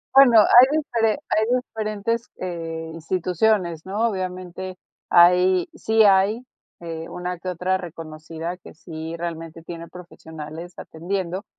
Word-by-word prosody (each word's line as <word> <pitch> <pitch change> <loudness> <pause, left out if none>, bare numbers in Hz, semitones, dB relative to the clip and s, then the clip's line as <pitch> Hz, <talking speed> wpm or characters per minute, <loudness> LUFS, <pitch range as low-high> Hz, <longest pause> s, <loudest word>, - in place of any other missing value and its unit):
Bueno, 245 -5 +8
hay 245 +4 +8
diferen 230 -8 0
hay 215 - +2
diferentes, 225 -1 -3
eh, 165 -2 -5
instituciones, 175 +1 0
¿no? 210 +5 0
Obviamente, 185 -1 -5 0.3
hay 180 +1 +5
sí 220 0 +2
hay, 205 +4 +3 0.4
eh, 165 -1 -6
una 180 0 -5
que 185 - -5
otra 185 +1 -1
reconocida 165 0 -7
que 175 - -15
sí 160 0 -7
realmente 165 -1 -6
tiene 170 0 -8
profesionales 165 -1 -10
atendiendo, 185 +3 -4
180 Hz, 120 wpm, -23 LUFS, 165-205 Hz, 0.4 s, Bueno